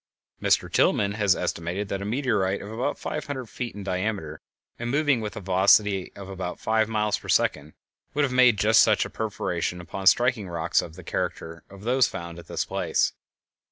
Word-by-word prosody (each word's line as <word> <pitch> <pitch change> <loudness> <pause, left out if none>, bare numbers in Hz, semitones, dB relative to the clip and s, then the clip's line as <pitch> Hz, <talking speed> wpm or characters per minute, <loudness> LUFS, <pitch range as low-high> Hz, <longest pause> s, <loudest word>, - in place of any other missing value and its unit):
Mr - - +2
Tilghman 100 0 +2
has 105 -3 +3
estimated 90 +5 -3
that 100 - -3
a - - -4
meteorite 105 -5 0
about 115 +7 -3
five 150 - -5
hundred 135 -3 -4
feet 120 0 -6
in 100 - -7
diameter 95 -5 -3 0.4
and 120 0 -3
moving 145 -2 +2
with 105 -2 -5
a - - -5
velocity 95 +1 +3
of 100 -1 -9
about 95 -2 -5
five 110 0 +1
miles 105 -1 0
per - - -12
second 75 +1 +1 0.4
would 145 - +2
have 135 -3 0
made 125 -3 +5
just 110 +2 +5
such 110 -2 +3
a - - -8
perforation 90 -5 -3
upon 90 +3 -4
striking 120 -3 +3
rocks 85 0 +1
of 80 - -9
the 90 - -11
character 80 0 -4
of 100 0 -13
those 125 +3 +3
found 85 0 -7
at - - -13
this - - -2
place. - - 0
100 Hz, 190 wpm, -25 LUFS, 90-115 Hz, 0.4 s, made